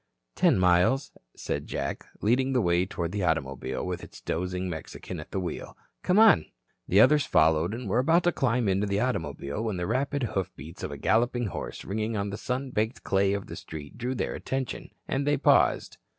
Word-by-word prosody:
"Ten - - +3
miles," 90 +9 +3 0.2
said - - -4
Jack, - - -4
leading 130 +5 +2
the 125 - +3
way 85 -1 +2
toward 85 -4 -3
the 100 +1 -2
automobile 70 -6 -1
with 90 -1 -4
its - - -11
dozing 90 +2 -2
Mexican 85 +1 -6
at 75 - -9
the 95 - -2
wheel. 90 -2 -5 0.2
"Come 180 - +2
on." 215 - +7 0.4
The 95 - +4
others 145 +4 +5
followed 80 +3 +3
and 120 -1 -6
were 105 +5 +2
about 165 +7 +3
to 175 - +3
climb 125 -6 +1
into 100 +2 +1
the 100 0 0
automobile 80 - -2
when 105 -4 -2
the 90 - -2
rapid 135 +5 -1
hoofbeats 85 -4 -5
of - - -3
a 70 - -6
galloping 120 - +1
horse 100 - -6
ringing 110 +2 -2
on 100 0 -2
the 105 - -4
sun 130 +3 -3
baked 110 +2 -1
clay 95 0 +2
of 100 -1 -3
the - - -8
street 75 +6 -9
drew 125 +2 -2
their - - -2
attention, 130 -2 -4 0.2
and 140 +1 -1
they 145 0 +3
paused. 145 - +3
100 Hz, 195 wpm, -27 LUFS, 90-125 Hz, 0.4 s, on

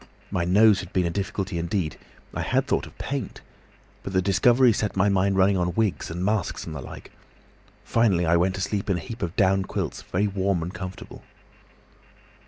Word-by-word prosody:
My 85 - 0
nose 100 +3 +5
had 95 - -8
been 90 -1 +2
a 85 - -1
difficulty 95 -2 -3
indeed—I 85 -2 -4
had - - +1
thought - - -1
of - - -17
paint. - - -4 0.6
But 100 - -6
the 95 - +3
discovery 120 +6 +4
set 105 -2 -2
my 100 +2 +4
mind 100 0 +2
running 95 +1 +4
on 90 -1 -1
wigs 110 -5 0
and 90 +3 -3
masks 105 -3 -1
and 80 - -6
the 75 - -5
like. - - -10 0.7
Finally 100 -7 +2
I 85 +1 +3
went 90 +2 +2
to 95 - -4
sleep 100 +1 -2
in 95 - +2
a - - -3
heap 115 +2 -8
of 90 -2 -3
down 95 -2 +3
quilts, - - -4
very 100 +4 -1
warm 95 -3 0
and 90 +3 -6
comfortable. 95 -3 -8
95 Hz, 190 wpm, -25 LUFS, 90-100 Hz, 0.7 s, nose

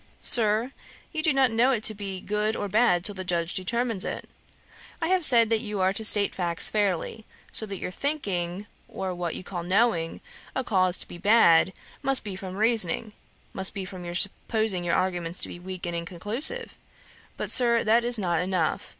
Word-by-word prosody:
'Sir, 225 +2 +6 0.4
you 315 - -2
do 310 - +3
not 265 -3 +2
know 235 +3 +2
it 235 -5 -1
to 215 - +4
be 200 -2 -5
good 210 +3 -2
or 205 - -4
bad 200 -4 +2
till 205 - +2
the 190 -1 -6
Judge 170 -1 -2
determines 230 +2 -2
it. - - -6 0.7
I 325 -1 -2
have 370 -1 +1
said 230 -5 +7
that 225 - +3
you 210 -3 -5
are 190 0 +1
to 220 - -3
state 205 -2 +6
facts 170 -2 +1
fairly; 205 +1 -2 0.3
so 220 - +3
that 195 -1 -5
your 180 - -6
thinking, 195 - -3 0.2
or 190 -1 -5
what 175 -2 -5
you - - -8
call 180 -1 -6
knowing, 180 -2 0 0.4
a 265 - -2
cause 185 -5 +1
to - - -4
be 175 - -11
bad, 190 -4 +4 0.3
must 270 -1 +2
be 205 -3 -5
from 185 -1 -8
reasoning, 215 -2 +1 0.4
must 190 0 +1
be 195 -2 -5
from 185 -1 -10
your 175 0 -7
supposing 200 0 -1
your 170 -1 0
arguments 175 -2 -2
to - - +1
be - - -9
weak 185 0 -8
and 175 0 -4
inconclusive. 210 - -3 0.6
But, - - -5
Sir, 235 -2 +2
that 230 +2 +2
is 240 0 +2
not 175 -5 -1
enough. 180 -3 -2
200 Hz, 195 wpm, -25 LUFS, 180-230 Hz, 0.7 s, said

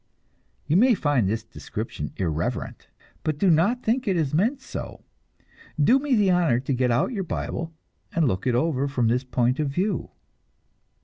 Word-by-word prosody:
You 155 +4 +2
may 245 +3 +5
find 145 - +1
this 110 +2 -2
description 75 - -6
irreverent, 80 -4 -3 0.4
but 155 -2 -1
do 190 +2 +3
not 200 +11 +2
think 245 +2 0
it 190 -3 +2
is 150 -4 0
meant 225 - +1
so. - - -8 0.8
Do 240 - +5
me 280 -2 +1
the 205 -4 +3
honor 170 -10 +3
to 135 +2 -2
get 125 0 +1
out 120 - +1
your 200 -4 -2
Bible 165 -1 -4 0.4
and 165 -3 +2
look 95 0 -1
it 125 - +2
over 140 0 +1
from 125 -5 +1
this 125 +3 +1
point 125 +1 0
of 150 -2 0
view! 185 +9 -1
155 Hz, 175 wpm, -25 LUFS, 125-195 Hz, 0.8 s, may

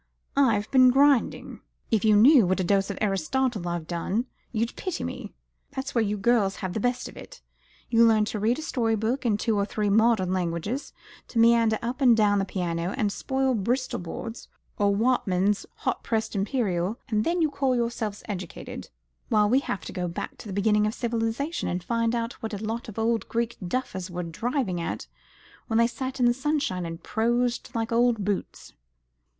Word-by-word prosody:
I've 225 -7 +3
been 255 -1 +7
grinding. 275 -1 +2 0.3
If 220 -3 +2
you 215 -1 +5
knew 240 - +7
what 185 +2 +1
a - - +1
dose 195 +2 +2
of 200 - -4
Aristotle 210 +2 0
I've 170 -2 -3
had, 185 +7 -1 0.3
you'd 230 0 -1
pity 370 - -4
me. - - -6 0.4
That's 265 0 -4
where 235 - +3
you 210 0 -1
girls 205 -2 +2
have 185 -2 -4
the 220 - -2
best 245 +3 -1
of - - -12
it. - - -12 0.4
You 230 0 +4
learn 220 -2 +5
to 210 0 -4
read 225 +5 +1
a 315 - -5
story 230 -7 0
book 235 +4 -1
in 210 -3 +2
two 225 +1 0
or 200 - +2
three 205 0 -1
modern 220 -4 +3
languages, 185 - -2 0.4
to - - -7
meander 230 -1 +5
up 250 +4 -3
and 245 -4 +6
down 205 -2 +3
the 195 - 0
piano, 175 -1 -2
and 210 -6 +1
spoil 265 +3 0
Bristol 245 +4 -1
board, 225 +7 -6 0.4
or 205 -1 +3
Whatman's 200 -3 +1
hot - - -2
pressed 220 -1 -2
imperial, 200 -1 -1
and 215 -2 +1
then 345 +6 0
you 315 -3 +2
call 270 -2 +1
yourselves 230 -3 -2
educated; 185 -5 -6 0.4
while 210 -3 +4
we 250 +5 +4
have 200 -7 -4
to - - -7
go 180 -1 -2
back 170 - -5
to - - -9
the 200 - -5
beginning 210 +1 +2
of 215 - -3
civilisation, 235 +6 -2
and 180 0 -3
find 230 +3 0
out 230 0 -2
what 220 -1 -4
a 215 - -5
lot 225 +2 -4
of 220 - -10
old 225 0 0
Greek 235 0 -1
duffers 190 -4 -3
were 175 0 -4
driving 190 - -2
at 110 -10 -4 0.6
when 225 - 0
they 230 - +5
sat 260 +2 -4
in 250 - +4
the 240 - +5
sunshine 265 - -1
and 165 +1 -8
prosed 240 +2 0
like 225 +1 -1
old 230 -3 +2
boots." 200 -1 -4
225 Hz, 195 wpm, -26 LUFS, 200-245 Hz, 0.6 s, been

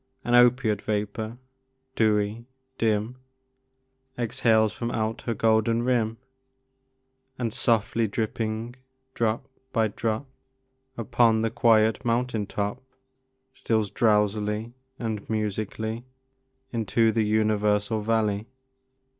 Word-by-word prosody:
An 120 - -1
opiate 120 -4 +4
vapor, 110 +2 -3 0.6
dewy, 110 +1 +1 0.3
dim, 110 +2 0 1.0
Exhales 110 -2 +2
from 120 - -3
out 110 -1 -2
her 115 - 0
golden 115 +2 +2
rim, 115 -3 +1 1.2
And, 115 -3 -2
softly 115 -2 +1
dripping, 110 +3 -3 0.4
drop 115 +3 -1 0.2
by 110 -3 +2
drop, 110 +4 -2 0.7
Upon 115 0 +2
the 115 - 0
quiet 110 -2 +3
mountain 115 -3 0
top, 105 +5 -3 0.7
Steals 110 -5 -1
drowsily 105 +1 +1 0.2
and 110 -4 -4
musically 110 +1 -2 0.7
Into 115 0 +2
the 110 0 +1
universal 105 0 +1
valley. 110 -1 0
110 Hz, 95 wpm, -26 LUFS, 105-115 Hz, 1.2 s, opiate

